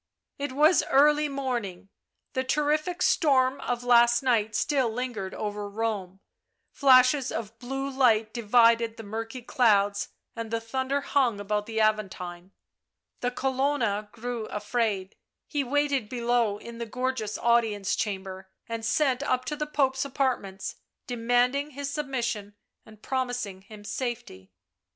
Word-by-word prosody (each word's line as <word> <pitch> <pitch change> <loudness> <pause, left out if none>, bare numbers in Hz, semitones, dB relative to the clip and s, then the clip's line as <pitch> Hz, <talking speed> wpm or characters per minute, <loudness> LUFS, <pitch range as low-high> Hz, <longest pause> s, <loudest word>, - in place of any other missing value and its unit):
It 285 -1 -3
was 305 +6 +5
early 295 +2 +4
morning; 240 -9 -4 0.4
the 260 - 0
terrific 305 +6 0
storm 265 -3 +3
of 245 0 -2
last 240 0 +5
night 220 -4 +1
still 270 -2 +1
lingered 225 -5 -4
over 205 -1 -4
Rome; 200 -3 -3 0.5
flashes 265 0 +5
of 225 +1 -5
blue 270 +2 -3
light 230 -5 +2
divided 230 0 +3
the 225 - -8
murky 225 +4 -6
clouds 205 -5 +2 0.3
and 230 -1 -5
the 230 0 -1
thunder 260 +4 -2
hung 260 -7 +1
about 210 +1 -2
the 225 -1 -2
Aventine; 190 -4 -1 0.7
the 245 - 0
Colonna 255 -5 0
grew 235 0 -5
afraid; 210 -2 -2 0.3
he 290 -2 -1
waited 275 -3 0
below 235 -3 +1
in 230 +2 -10
the 235 - -4
gorgeous 250 -3 -2
audience 225 -4 +2
chamber 190 -2 -4 0.2
and 230 0 -4
sent 260 +2 +1
up 255 -3 0
to 300 - -3
the 300 0 -3
Pope's 265 -3 +1
apartments, 255 -8 -2 0.3
demanding 245 +4 +1
his 280 0 -5
submission 235 -8 -3 0.3
and 215 -1 -16
promising 245 -7 -3
him 205 +1 -13
safety. 235 - -5
235 Hz, 130 wpm, -27 LUFS, 210-265 Hz, 0.7 s, was